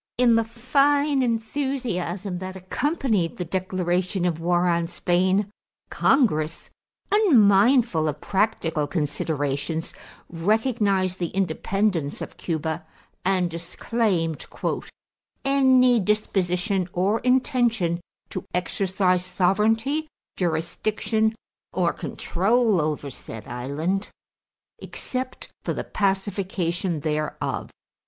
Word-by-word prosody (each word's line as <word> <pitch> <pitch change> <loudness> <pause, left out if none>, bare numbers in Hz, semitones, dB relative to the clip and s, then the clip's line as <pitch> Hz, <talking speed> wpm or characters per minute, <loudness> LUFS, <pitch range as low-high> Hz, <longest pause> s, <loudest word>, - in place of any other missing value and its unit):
In 245 -1 +5
the 230 0 +4
fine 275 +5 +2
enthusiasm 225 -7 -2
that 185 0 -6
accompanied 210 - -1
the 180 - -3
declaration 185 +1 -1
of 165 -3 0
war 175 +1 +2
on 170 -1 +1
Spain, 185 +4 +1 0.4
Congress, 165 - +2 0.4
unmindful 230 - +5
of 150 - -2
practical 180 -7 0
considerations, 145 0 -2 0.3
recognized 200 0 +1
the 175 - 0
independence 185 -2 -1
of - - -7
Cuba 160 0 -2 0.4
and 185 -2 +1
disclaimed 170 0 -1 1.0
"any 260 -3 +5
disposition 190 -2 0
or 195 +5 +1
intention 240 - +2 0.3
to - - -4
exercise 185 0 +1
sovereignty, 215 - +1 0.3
jurisdiction, 215 +6 0 0.4
or 175 -2 +1
control 210 +1 +1
over 150 -2 -2
said 110 -3 -9
island 150 +11 -2 0.7
except 255 0 -5
for - - -1
the - - -3
pacification 190 -4 -1
thereof." 155 0 -2
190 Hz, 90 wpm, -24 LUFS, 170-225 Hz, 1.0 s, In